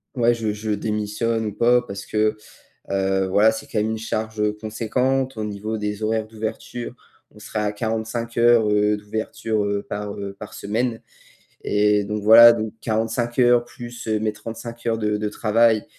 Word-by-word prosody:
ouais, 120 -1 +3
je 115 -2 -2
je 105 +1 -4
démissionne 105 +2 -1
ou 105 - -3
pas?» 120 +3 +4
parce 100 0 -7
que, 110 0 +1 0.6
heu, 95 0 +1
voilà, 105 +4 +4
c'est 110 +5 -6
quand 130 -6 -2
même 105 +1 0
une 110 - -2
charge 110 -1 -2
conséquente 125 +4 -1
au 110 - -4
niveau 105 +1 -4
des 105 0 -3
horaires 110 0 0
d'ouverture. 110 +2 -5 0.4
On 105 - -17
sera 105 0 -4
à 105 - 0
45 110 +2 -3
heures, 115 -2 +5
heu, 105 0 +2
d'ouverture, 110 +1 -3
heu, 100 0 -1
par, 105 0 -5
heu, 100 -1 -6
par 105 - -9
semaine 115 +3 -2 0.6
et 105 0 +2
donc 105 +1 -4
voilà, 115 +2 +10
donc 110 -2 -3
45 115 +2 -1
heures 120 -1 +5
plus 120 -1 -9
mes 110 0 0
35 115 +2 -8
heures 115 -1 +1
de 105 -1 0
de 105 0 -2
travail, 110 +1 +2
110 Hz, 175 wpm, -22 LUFS, 105-115 Hz, 0.6 s, voilà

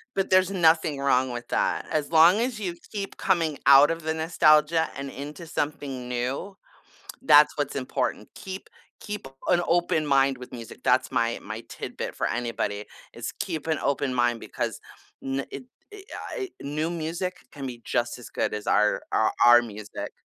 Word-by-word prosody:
But 195 - 0
there's 185 0 +4
nothing 160 -5 +3
wrong 130 -2 +2
with 120 0 -6
that, - - 0
as 155 0 -1
long 170 +5 +7
as 240 -3 -2
you 175 -3 -3 0.2
keep 200 -2 -5
coming 165 -6 0
out 140 +2 +8
of 165 0 -3
the 160 0 -1
nostalgia 160 0 +3
and 140 0 -5
into 145 +5 -8
something 145 -5 -4
new, 130 +11 -3 0.7
that's - - +6
what's - - -2
important. - - -2
Keep 190 -1 -8 0.3
keep 210 -9 -6 0.2
an 175 - +4
open 170 -2 +2
mind 135 -2 +3
with 125 - -11
music, 115 -2 -9
that's 130 +1 +2
my 115 0 0
my 110 +2 -6
tidbit - - -6
for - - -1
anybody, 110 -3 -2 0.3
is 115 0 -5
keep 170 -7 -3
an 160 -2 0
open 140 -2 0
mind 120 -1 +1
because - - -4 0.4
ne 135 0 -2
it - - -7 0.3
I - - -10 0.4
I 390 -6 -4
new 150 +3 -2
music 170 +3 -3
can 140 -2 -7
be 120 -2 -8
just 120 +1 -1
as 120 - -11
good - - -2
as 105 +1 -5
our 105 0 +3
our - - +2
our 120 0 +8
music. 105 -2 -7
145 Hz, 170 wpm, -26 LUFS, 125-170 Hz, 0.7 s, out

